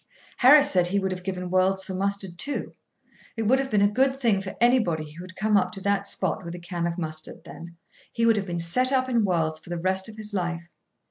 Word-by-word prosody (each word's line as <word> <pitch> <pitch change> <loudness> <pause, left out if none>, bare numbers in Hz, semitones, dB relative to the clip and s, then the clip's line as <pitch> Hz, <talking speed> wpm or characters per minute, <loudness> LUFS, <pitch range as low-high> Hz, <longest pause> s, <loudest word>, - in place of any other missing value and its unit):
Harris 285 +3 +7
said 180 -2 +3
he 195 +3 0
would 190 -1 -1
have 180 -1 -5
given 180 -1 -4
worlds 190 +1 +2
for 190 - -5
mustard 195 -2 -2
too. 290 - -2 0.6
It 225 - -1
would 255 +5 +3
have 270 0 -2
been 210 -3 +2
a - - +6
good 265 +6 +1
thing 225 -7 +2
for 190 -1 -7
anybody 180 -11 +2
who 170 +4 -10
had 185 0 -12
come 215 +1 +1
up 200 - +2
to 195 - -3
that 200 0 0
spot - - -1
with 170 0 -7
a - - -8
can 170 0 -3
of 170 +1 -4
mustard, 155 -2 -5
then: 170 0 -11 0.3
he 230 - 0
would 225 -1 +4
have 200 -1 -2
been 175 -1 -3
set 170 +11 +1
up 260 -1 +2
in 235 -3 +1
worlds 160 -5 0
for 170 - -16
the 175 - -3
rest 190 +3 -1
of 215 - -11
his 215 -1 -6
life. 175 -3 -3
190 Hz, 250 wpm, -25 LUFS, 175-220 Hz, 0.6 s, Harris